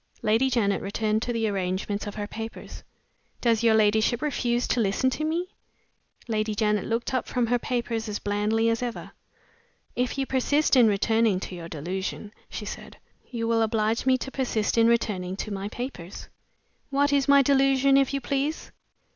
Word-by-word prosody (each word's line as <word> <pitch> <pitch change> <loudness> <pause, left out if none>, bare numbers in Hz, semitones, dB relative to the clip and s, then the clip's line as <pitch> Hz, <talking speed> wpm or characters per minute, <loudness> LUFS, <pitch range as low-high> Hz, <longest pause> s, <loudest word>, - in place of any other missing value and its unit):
Lady 225 +4 +3
Janet 210 -6 +1
returned 215 +2 -1
to 245 - -2
the 225 -2 0
arrangement 200 +1 -2
of 205 - -6
her 210 -1 -3
papers. 225 +2 -8 0.6
"Does 230 -2 +2
your 230 -2 +4
ladyship 220 +2 +3
refuse 245 -5 0
to - - +1
listen 225 +5 +1
to 310 - -3
me?" 335 +4 -1 0.8
Lady 215 -1 -1
Janet 210 -1 +1
looked 230 +3 -2
up 255 - -1
from 245 -2 0
her 245 +1 +1
papers 235 -2 -2
as 205 - -2
blandly 210 +2 0
as 230 +1 +1
ever. 240 -2 -5 0.8
"If 250 +2 -1
you 270 - 0
persist 280 +3 +2
in 245 -3 +6
returning 220 -1 +2
to - - -6
your 170 -2 -7
delusion," 190 +6 -5 0.2
she - - -6
said, - - -8 0.3
"you 230 -2 -3
will 230 0 +2
oblige 220 +2 0
me 260 0 +5
to 270 - -6
persist 240 -6 -1
in 230 0 +5
returning 195 -6 0
to 210 - -5
my 195 +1 -4
papers." 210 -7 -7 0.6
"What 285 +1 +2
is 280 -1 +2
my 280 0 +6
delusion, 275 0 +4
if 275 -1 +3
you 275 -1 -2
please?" 280 +5 -2
230 Hz, 175 wpm, -26 LUFS, 210-260 Hz, 0.8 s, in